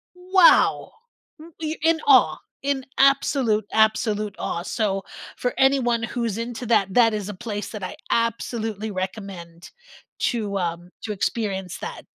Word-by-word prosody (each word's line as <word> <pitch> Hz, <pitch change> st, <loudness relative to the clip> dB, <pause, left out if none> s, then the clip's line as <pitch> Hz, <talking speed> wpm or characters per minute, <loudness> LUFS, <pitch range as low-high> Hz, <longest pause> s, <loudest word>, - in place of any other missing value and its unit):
wow!" 365 Hz, 0 st, +4 dB, 0.5 s
W 325 Hz, +1 st, -13 dB
you're 315 Hz, 0 st, -3 dB
in 325 Hz, 0 st, +3 dB
awe, -, -, +6 dB, 0.3 s
in 275 Hz, -2 st, -1 dB
absolute, 270 Hz, -6 st, +3 dB
absolute 215 Hz, -1 st, +1 dB
awe, 170 Hz, -, -3 dB
so 195 Hz, -2 st, -1 dB, 0.3 s
for 250 Hz, -, -1 dB
anyone 260 Hz, -4 st, +3 dB
who's 235 Hz, -2 st, -2 dB
into 240 Hz, +1 st, -5 dB
that 195 Hz, -5 st, +2 dB
that 230 Hz, -3 st, +5 dB
is 210 Hz, -1 st, -3 dB
a -, -, -4 dB
place 210 Hz, 0 st, -5 dB
that 210 Hz, -4 st, -7 dB
I -, -, -5 dB, 0.2 s
absolutely 225 Hz, -2 st, -1 dB
recommend 185 Hz, -3 st, -6 dB, 0.6 s
to, 210 Hz, -4 st, -2 dB
um 175 Hz, 0 st, -3 dB
to 215 Hz, -, -4 dB
experience 195 Hz, -3 st, -2 dB
that. -, -, -7 dB
220 Hz, 140 wpm, -23 LUFS, 195-245 Hz, 0.6 s, awe